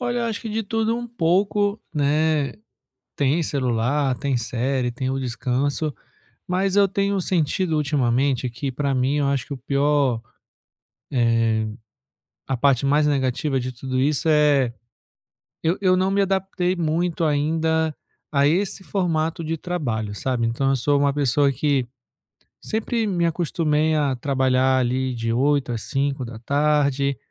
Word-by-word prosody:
Olha, 245 Hz, -1 st, -1 dB
eu -, -, 0 dB
acho 225 Hz, -2 st, -3 dB
que 225 Hz, -, -6 dB
de 220 Hz, +1 st, -2 dB
tudo 225 Hz, +3 st, -1 dB
pouco, 200 Hz, +4 st, +1 dB
né. 150 Hz, -1 st, +1 dB, 0.6 s
Tem 145 Hz, +4 st, +2 dB
celular, 130 Hz, 0 st, 0 dB
tem -, -, -5 dB
série, 125 Hz, +1 st, -1 dB
tem 130 Hz, +1 st, -3 dB
o 135 Hz, -, -1 dB
descanso, 135 Hz, +4 st, -1 dB, 0.5 s
mas 190 Hz, +2 st, 0 dB
eu 200 Hz, -1 st, +5 dB
tenho 200 Hz, +1 st, 0 dB
sentido 170 Hz, 0 st, 0 dB
ultimamente 135 Hz, -3 st, +1 dB
que, 130 Hz, +3 st, -4 dB
para 140 Hz, +2 st, -1 dB
mim, 130 Hz, +3 st, +1 dB
eu 145 Hz, -1 st, +1 dB
acho 140 Hz, -3 st, -1 dB
que 140 Hz, -, -5 dB
o -, -, -5 dB
pior, 140 Hz, -2 st, +1 dB, 0.9 s
eh, 115 Hz, -3 st, +2 dB, 0.8 s
a 135 Hz, -, -1 dB
parte 140 Hz, +1 st, +2 dB
mais 150 Hz, +2 st, +3 dB
negativa 135 Hz, 0 st, 0 dB
de 125 Hz, +1 st, -3 dB
tudo 130 Hz, +1 st, -3 dB
isso 145 Hz, +3 st, +1 dB
é; 145 Hz, -5 st, +3 dB, 0.9 s
eu 165 Hz, +3 st, +1 dB
eu 185 Hz, -2 st, +3 dB
não 185 Hz, +1 st, +1 dB
me 200 Hz, +1 st, +2 dB
adaptei 190 Hz, -1 st, 0 dB
muito 170 Hz, +1 st, 0 dB
ainda 160 Hz, +1 st, +1 dB, 0.4 s
a 140 Hz, -1 st, +3 dB
esse 190 Hz, +5 st, 0 dB
formato 165 Hz, -4 st, -1 dB
de 165 Hz, +1 st, -2 dB
trabalho, 120 Hz, -, -3 dB
sabe? 120 Hz, +1 st, -1 dB
Então 120 Hz, +4 st, 0 dB
eu 135 Hz, -, +2 dB
sou 140 Hz, +3 st, +2 dB
uma 140 Hz, 0 st, +3 dB
pessoa 140 Hz, 0 st, +2 dB
que 140 Hz, -1 st, 0 dB, 0.8 s
sempre 225 Hz, +1 st, -1 dB
me 175 Hz, -4 st, 0 dB
acostumei 160 Hz, -2 st, +1 dB
a 145 Hz, -3 st, +1 dB
trabalhar 130 Hz, 0 st, +2 dB
ali 130 Hz, +1 st, 0 dB
de 115 Hz, -1 st, -2 dB
8h 140 Hz, +1 st, +1 dB
às 115 Hz, -, -4 dB
17h, 140 Hz, +1 st, 0 dB
145 Hz, 145 wpm, -23 LUFS, 130-165 Hz, 0.9 s, eu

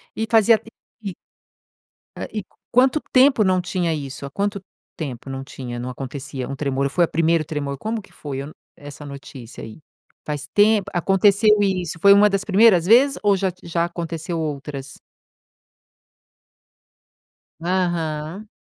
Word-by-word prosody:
E 220 Hz, -, -1 dB
fazia 225 Hz, 0 st, +5 dB
tempo 225 Hz, -, -16 dB, 0.3 s
que 195 Hz, -4 st, -5 dB, 1.2 s
e 215 Hz, -2 st, -3 dB, 0.3 s
quanto 260 Hz, +4 st, +3 dB
tempo 255 Hz, -3 st, +5 dB
não 185 Hz, -2 st, +2 dB
tinha 180 Hz, -2 st, -1 dB
isso, 140 Hz, -1 st, -6 dB
há -, -, -6 dB
quanto 200 Hz, +5 st, -2 dB, 0.4 s
tempo 135 Hz, -4 st, -6 dB
não 135 Hz, 0 st, -5 dB
tinha, 125 Hz, -3 st, -7 dB
não 125 Hz, +1 st, -4 dB
acontecia 135 Hz, 0 st, -6 dB
um 140 Hz, -, -5 dB
tremor, 140 Hz, -1 st, -1 dB
foi 175 Hz, +5 st, +3 dB
o -, -, -9 dB
primeiro 165 Hz, 0 st, +1 dB
tremor, 145 Hz, -2 st, -4 dB
como 220 Hz, +5 st, -3 dB
que -, -, -20 dB
foi 140 Hz, -3 st, -6 dB
eu 140 Hz, -, -5 dB
não, 155 Hz, -, -11 dB, 0.2 s
essa 145 Hz, 0 st, -10 dB
notícia 135 Hz, -4 st, -10 dB
aí? 110 Hz, +5 st, -10 dB, 0.5 s
Faz 150 Hz, -1 st, -4 dB
tempo 210 Hz, -1 st, +4 dB
aconteceu 195 Hz, +4 st, +3 dB
isso, 185 Hz, -5 st, -1 dB
foi 200 Hz, 0 st, +8 dB
uma 205 Hz, +1 st, +6 dB
das 195 Hz, 0 st, -1 dB
primeiras 200 Hz, -4 st, +5 dB
vezes 255 Hz, +7 st, +5 dB
ou 205 Hz, -1 st, +4 dB
já 190 Hz, -1 st, 0 dB
t 180 Hz, -, -21 dB
já 170 Hz, 0 st, 0 dB
aconteceu 170 Hz, -1 st, -4 dB
outras? 140 Hz, -3 st, -5 dB, 2.6 s
Aham. 175 Hz, +1 st, -2 dB
170 Hz, 150 wpm, -22 LUFS, 140-200 Hz, 2.6 s, foi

